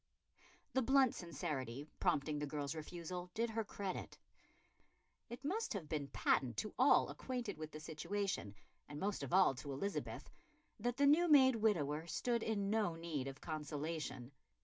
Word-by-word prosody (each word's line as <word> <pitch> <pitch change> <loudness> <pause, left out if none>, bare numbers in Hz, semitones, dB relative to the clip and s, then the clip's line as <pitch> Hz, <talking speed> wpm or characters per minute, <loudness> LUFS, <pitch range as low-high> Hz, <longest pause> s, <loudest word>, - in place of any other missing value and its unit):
The 260 - +3
blunt 265 0 +5
sincerity 145 -5 -4
prompting 150 +1 +1
the 150 - -2
girl's 145 0 -3
refusal 175 +3 -6
did 230 +1 0
her 225 0 -1
credit. 195 -2 -5 1.1
It 240 +4 -8
must 420 - -1
have 185 -7 -4
been 150 -2 -2
patent 125 -4 +1
to 215 - -2
all 265 +3 +6
acquainted 245 -8 -4
with 155 0 -5
the 155 - -7
situation, 165 - -3 0.3
and 145 - -6
most 200 +3 -1
of - - -5
all 185 -5 +6
to 135 +2 -7
Elizabeth, 200 +10 -3 0.5
that 240 +3 -1
the 285 - +4
new 315 +5 +6
made 260 -4 +7
widower 165 -8 +1
stood 235 +5 0
in 200 -3 0
no 215 -6 +1
need 160 -5 -3
of 135 +1 -7
consolation. 150 -4 -4
170 Hz, 155 wpm, -38 LUFS, 150-225 Hz, 1.1 s, made